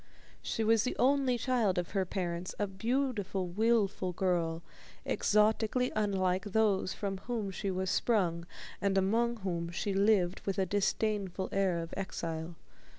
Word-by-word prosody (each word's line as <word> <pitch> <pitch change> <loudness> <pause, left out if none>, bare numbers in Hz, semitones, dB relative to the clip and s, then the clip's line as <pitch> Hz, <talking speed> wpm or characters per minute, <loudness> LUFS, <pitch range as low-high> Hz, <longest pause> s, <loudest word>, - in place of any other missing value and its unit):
She 225 - -2
was 225 0 +4
the 250 - -2
only 265 -1 +3
child 235 -7 +1
of 175 -1 -2
her 195 -2 0
parents, 175 -1 -3
a 205 - +1
beautiful, 205 -1 -1
willful 200 -1 +1
girl, 170 -3 0 0.4
exotically 220 +4 +2
unlike 190 -3 +1
those 205 -2 +1
from 195 -2 -3
whom 220 -2 -3
she 195 +1 -3
was 185 0 -1
sprung 170 -7 +1 0.3
and 200 -1 +1
among 230 +5 +2
whom 170 -3 -2
she 195 +3 -2
lived 195 -2 +2
with 195 -2 -2
a 190 - +2
disdainful 200 -1 -1
air 195 -3 +1
of 165 0 -5
exile. 165 -3 -4
195 Hz, 145 wpm, -32 LUFS, 180-220 Hz, 0.4 s, was